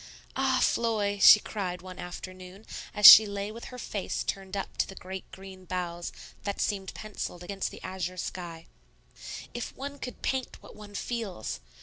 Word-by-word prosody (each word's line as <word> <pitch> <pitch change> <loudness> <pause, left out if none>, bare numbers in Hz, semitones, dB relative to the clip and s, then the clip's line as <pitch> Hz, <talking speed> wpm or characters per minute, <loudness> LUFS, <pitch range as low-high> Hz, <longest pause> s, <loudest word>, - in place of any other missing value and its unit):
"Ah, 265 -1 +2
Floy," 210 -3 +1
she 210 - +10
cried 185 -5 -4
one 185 -1 -9
afternoon, 185 +3 -9 0.3
as 210 -1 +2
she 220 +1 +13
lay 200 +1 -4
with 230 +2 -9
her 250 - -9
face 210 -4 -3
turned 195 0 -4
up 195 - -5
to - - +1
the 195 - -10
great 190 0 -8
green 190 -1 -11
boughs 175 -1 -4 0.3
that 200 -1 -3
seemed 195 -2 -2
pencilled 200 -4 -6
against 195 +2 -3
the - - -12
azure 185 -1 -4
sky, 170 -2 -6 0.9
"if 240 -1 -6
one 280 +1 -6
could 250 - -7
paint 260 -1 -2
what - - -14
one 210 -1 -11
feels! 200 - -4
195 Hz, 165 wpm, -29 LUFS, 185-215 Hz, 0.9 s, she